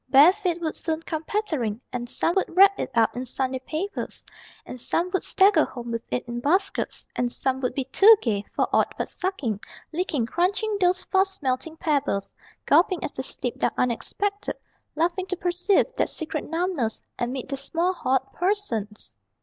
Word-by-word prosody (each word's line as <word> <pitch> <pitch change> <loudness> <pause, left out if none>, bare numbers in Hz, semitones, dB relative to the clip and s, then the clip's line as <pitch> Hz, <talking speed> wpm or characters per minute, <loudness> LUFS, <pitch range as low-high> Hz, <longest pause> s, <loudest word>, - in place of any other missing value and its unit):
Bare 290 +7 +8
feet 365 -4 -1
would 315 - -1
soon 320 -1 -2
come 320 -1 -3
pattering, 300 - -1
And 240 -1 -4
some 335 - +1
would 380 - +1
wrap 395 +1 +7
it - - -2
up 225 -1 +3
in 250 - -3
Sunday 260 +1 -2
papers, 325 +9 -5 0.4
And 250 - -8
some 345 +8 0
would 380 - +1
stagger 380 -5 +5
home 240 -2 -6
with 230 0 -4
it 250 - -2
in 240 0 -4
baskets, 315 +10 0
And 245 -1 0
some 265 +1 -1
would 250 -1 -1
be 270 - 0
too 400 - +7
gay 205 - -1
for - - +2
aught - - +2
but - - -2
sucking, 305 - -2 0.3
Licking, 310 -8 0
crunching 390 - 0
those 360 0 +3
fast 385 -2 0
melting 270 +5 -1
pebbles, 280 -11 0 0.3
Gulping 345 +3 +4
as - - -2
they - - -4
slipped 250 -2 -3
down - - +1
unexpected 405 - -1 0.4
Laughing 350 +4 0
to 370 - -2
perceive 360 +6 +2
that - - 0
secret 315 -1 -3
numbness 325 -9 -1 0.2
Amid 250 +1 -3
their 275 - -2
small 335 +6 0
hot 265 -5 -1
persons! 340 - -2
315 Hz, 175 wpm, -25 LUFS, 250-370 Hz, 0.4 s, Bare